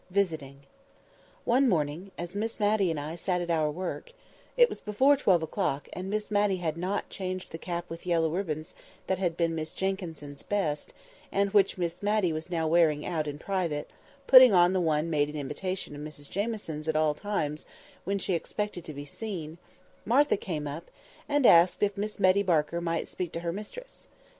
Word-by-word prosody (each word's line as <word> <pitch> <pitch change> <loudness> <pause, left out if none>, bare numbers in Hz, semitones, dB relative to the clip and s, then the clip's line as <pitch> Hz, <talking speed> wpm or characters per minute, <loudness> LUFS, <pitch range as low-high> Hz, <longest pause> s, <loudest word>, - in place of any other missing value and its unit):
VISITING 160 -8 -1 0.8
ONE 255 +2 +4
morning, 160 +1 -1
as 175 +2 -6
Miss 225 +3 -2
Matty 205 -3 +3
and 160 -2 -1
I 150 +3 -5
sat 180 +1 -1
at 175 -1 -2
our 155 -2 +2
work—it 480 - -1
was - - -8
before 260 +7 +4
twelve 185 - +3
o'clock, 160 -4 -2
and 185 +1 -5
Miss 215 +1 -2
Matty 205 -2 +2
had 165 -3 -2
not 185 +4 -3
changed 185 -1 -5
the 160 - -6
cap 175 0 -4
with 165 +2 -9
yellow 165 -2 +3
ribbons 160 -4 -3 0.3
that 190 -1 -1
had 175 -3 -1
been 165 -1 +1
Miss 155 -1 -4
Jenkyns's 165 -7 -3
best, 160 -8 -2 0.4
and 200 0 +1
which 200 -2 +3
Miss 175 -1 -3
Matty 205 -4 +1
was 155 +2 -5
now 165 -2 0
wearing 155 -2 +3
out 155 -3 -1
in 145 0 -4
private, 170 -4 -2 0.3
putting 255 -2 +9
on 175 +1 +5
the 185 - +2
one 155 -1 +1
made 145 -1 +2
in 150 - -8
imitation 150 +4 -4
of 145 - -8
Mrs 150 -1 -8
Jamieson's 200 -7 -3
at 160 - 0
all 155 -1 +3
times 155 -4 -3 0.4
when 200 +2 -1
she 195 0 -1
expected 185 +1 -3
to 155 - -7
be 145 +1 -6
seen—Martha 185 - -2
came 160 -7 -4
up, 145 +4 -6 0.4
and 290 -2 +2
asked 170 +2 +6
if 200 -1 +1
Miss 210 +1 -4
Betty 190 0 +4
Barker 170 -3 +1
might 165 -1 -1
speak 180 -3 -4
to 165 - -4
her 170 -1 -2
mistress. 350 - -9
175 Hz, 185 wpm, -28 LUFS, 155-200 Hz, 0.8 s, putting